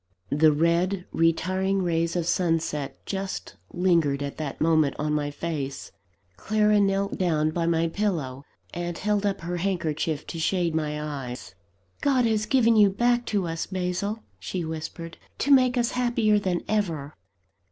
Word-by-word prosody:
The 155 +2 +5
red, 170 +5 +1
retiring 185 +4 +1
rays 170 -1 0
of 175 -2 0
sunset 165 -5 -1
just 195 -1 -4 0.2
lingered 170 -6 +2
at 140 - -5
that 150 -3 -5
moment 155 -3 +3
on 150 0 -1
my 145 -1 0
face. 145 -2 -4 0.5
Clara 210 - +2
knelt 195 0 +1
down 155 -4 +1
by 165 +1 -1
my 165 0 +2
pillow, 165 -9 -2 0.3
and 175 0 -4
held 210 0 0
up 195 -1 -2
her 175 +1 -3
handkerchief 165 -5 -1
to 165 - -6
shade 170 0 +1
my 150 -1 -1
eyes 130 - -6 0.5
"God 265 -4 +3
has 215 -2 +1
given 230 -2 +4
you 210 -2 +6
back 240 +4 +1
to 200 -4 0
us, 165 0 -3
Basil," 190 +4 -2 0.2
she 180 -3 -4
whispered, 160 +1 -6 0.2
"to 285 - 0
make 255 -2 +5
us 240 -1 +1
happier 235 -4 +2
than 185 -3 -1
ever." 165 -9 -1
175 Hz, 150 wpm, -26 LUFS, 155-200 Hz, 0.5 s, you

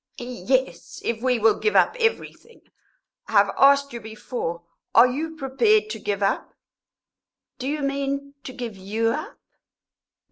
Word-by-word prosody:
"Yes, 250 +2 -2
if 230 -1 -2
we 250 -1 +2
will 225 0 +3
give 430 - 0
up - - +4
everything. 460 0 -2 0.7
I - - -9
have 200 -1 +4
asked 280 0 +4
you 235 - -6
before 215 -5 -5 0.3
are 230 - +9
you 310 +6 -3
prepared 425 - +2
to - - -5
give 200 -1 -2
up?" 195 - -1 1.0
"Do 260 - -4
you 295 +1 -2
mean, 280 0 -2
to - - -6
give 240 -4 -6
you 210 +4 -1
up?" 300 +7 -4
255 Hz, 145 wpm, -24 LUFS, 220-280 Hz, 1.0 s, are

